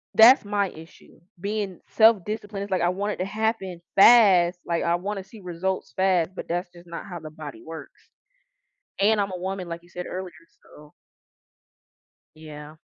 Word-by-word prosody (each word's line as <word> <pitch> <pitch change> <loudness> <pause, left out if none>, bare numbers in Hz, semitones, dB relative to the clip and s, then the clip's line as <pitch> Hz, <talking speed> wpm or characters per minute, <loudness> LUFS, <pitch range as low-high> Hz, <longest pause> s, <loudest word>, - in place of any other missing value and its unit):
that's 240 +5 +8
my 205 -1 0
issue. 160 0 -15 0.2
Being 200 -2 -3
self-disciplined, 215 -2 +2
it's 200 - -9
like 185 - +1
I 175 - +3
want 200 +3 -2
it - - -9
to 185 - -2
happen 205 -3 -2 0.2
fast, 190 -6 +6
like 170 -1 -1
I 170 0 +2
wanna 195 +2 -4
see 200 +4 -15
results 180 +1 -4
fast, 185 -3 +2
but - - -7
that's 175 +1 -3
just 175 0 -16
not 170 +2 -7
how 175 -3 -7
the 155 - -9
body 150 -7 -9
works. 160 0 -11 0.9
And 210 +1 +3
I'm 200 -1 0
a - - -4
woman, 190 0 -4
like 170 0 -7
you 175 - -21
said 180 0 -6
earlier, 185 -1 -6 0.3
so 150 0 -17 1.4
Yeah. 155 -1 -11
185 Hz, 170 wpm, -25 LUFS, 170-200 Hz, 1.4 s, that's